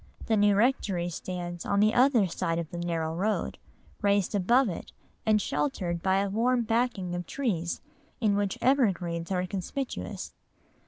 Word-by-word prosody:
The 225 - +2
new 205 -1 +4
rectory 200 -6 +1
stands 175 0 -5
on 200 - +1
the 215 +2 +4
other 250 -4 +5
side 165 -1 -2
of 170 -1 -4
the 175 - -5
narrow 165 -2 -1
road, 205 +6 -1 0.4
raised 200 -2 +2
above 235 +7 +4
it, 175 - -5 0.4
and 215 -1 +5
sheltered 170 +1 -1
by 190 +1 +2
a 200 - -1
warm 240 +3 +2
backing 225 -6 0
of 175 -1 -4
trees 185 -11 -2 0.4
in 215 -4 +2
which 200 -1 0
evergreens 185 -11 +1
are 180 -1 +1
conspicuous. 200 +9 -4
195 Hz, 155 wpm, -28 LUFS, 175-225 Hz, 0.4 s, other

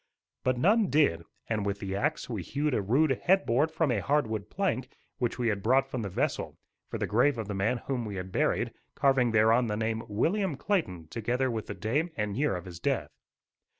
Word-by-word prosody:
But 130 -1 +1
none 205 - +4
did, 85 - +2 0.2
and, 110 -2 -1
with 100 0 -1
the 95 -1 -4
axe, 150 +9 -1
we 110 -6 -3
hewed 145 - -1
a 110 - +1
rude 135 +10 +3
head 190 +2 +3
board 130 +7 +2
from 160 -3 0
a 115 - +1
hard 150 -1 +2
wood 110 -2 -4
plank 130 -10 -1 0.3
which 120 -2 -1
we 120 -2 +1
had 100 -2 -1
brought 130 +5 +3
from 130 -2 -4
the 100 - -3
vessel, 90 - -2 0.3
for - - -3
the - - -1
grave 125 +5 +3
of 110 -3 -4
the 105 - -3
man 100 +6 +1
whom 130 -3 -1
we 105 -3 -5
had 95 0 -5
buried, - - +1 0.2
carving 135 -3 +3
thereon 115 +2 +4
the 105 -1 -1
name 110 0 -1
"William 165 - 0
Clayton," 110 - -1
together 125 +5 -1
with 110 -2 -4
the - - -5
day 145 +10 0
and 105 -2 -1
year 145 -4 +1
of 90 0 -6
his 85 -2 -9
death. - - -1
120 Hz, 215 wpm, -29 LUFS, 105-140 Hz, 0.3 s, none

